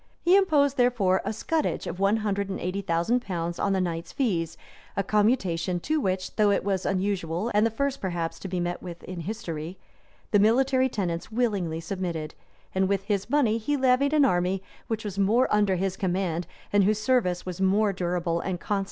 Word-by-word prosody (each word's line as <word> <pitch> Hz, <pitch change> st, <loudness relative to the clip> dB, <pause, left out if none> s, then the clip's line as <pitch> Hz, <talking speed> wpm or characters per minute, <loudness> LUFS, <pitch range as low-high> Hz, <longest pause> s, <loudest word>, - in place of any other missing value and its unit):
He 355 Hz, +2 st, +4 dB
imposed, 290 Hz, -8 st, +3 dB
therefore, 235 Hz, -7 st, +3 dB
a -, -, -2 dB
scutage 310 Hz, +8 st, -1 dB
of 180 Hz, -, -5 dB
one 200 Hz, +3 st, +3 dB
hundred 200 Hz, -1 st, -1 dB
and 190 Hz, -, -3 dB
eighty 185 Hz, +3 st, -2 dB
thousand 175 Hz, +7 st, +1 dB
pounds 170 Hz, -5 st, -4 dB
on 200 Hz, -, +1 dB
the 190 Hz, -, +2 dB
knights' 170 Hz, -2 st, -3 dB
fees, 180 Hz, -, -1 dB, 0.4 s
a 200 Hz, -, +2 dB
commutation 195 Hz, -5 st, +1 dB
to 310 Hz, -, 0 dB
which, 185 Hz, -3 st, -2 dB
though 210 Hz, -1 st, +4 dB
it 200 Hz, -, +2 dB
was 195 Hz, -2 st, -1 dB
unusual, 190 Hz, +1 st, -1 dB
and 210 Hz, +2 st, +4 dB
the -, -, -1 dB
first 275 Hz, +4 st, -2 dB
perhaps 170 Hz, -3 st, -3 dB
to -, -, -6 dB
be 180 Hz, -1 st, -2 dB
met 175 Hz, 0 st, -2 dB
with 175 Hz, -2 st, -8 dB
in 185 Hz, -1 st, -7 dB
history,[*] 170 Hz, -3 st, -5 dB, 0.5 s
the 205 Hz, -, +5 dB
military 260 Hz, +5 st, +3 dB
tenants 175 Hz, -4 st, -3 dB
willingly 200 Hz, -9 st, 0 dB
submitted; 165 Hz, -3 st, -4 dB, 0.4 s
and 190 Hz, 0 st, +1 dB
with 195 Hz, -1 st, 0 dB
this 200 Hz, 0 st, -1 dB
money 240 Hz, -6 st, +2 dB
he 290 Hz, +6 st, -1 dB
levied 265 Hz, +2 st, +3 dB
an 295 Hz, -2 st, +5 dB
army 185 Hz, -3 st, +1 dB, 0.2 s
which 225 Hz, -1 st, -3 dB
was 200 Hz, -1 st, -4 dB
more 220 Hz, +6 st, +3 dB
under 205 Hz, -2 st, +3 dB
his 190 Hz, +1 st, -1 dB
command, 180 Hz, -3 st, -1 dB, 0.3 s
and 205 Hz, -1 st, +5 dB
whose 210 Hz, +2 st, +2 dB
service 215 Hz, -7 st, +1 dB
was 180 Hz, 0 st, -5 dB
more 200 Hz, +2 st, +3 dB
durable 175 Hz, -2 st, -1 dB
and 180 Hz, 0 st, -3 dB
constant. 205 Hz, +1 st, -1 dB
195 Hz, 195 wpm, -26 LUFS, 180-225 Hz, 0.5 s, the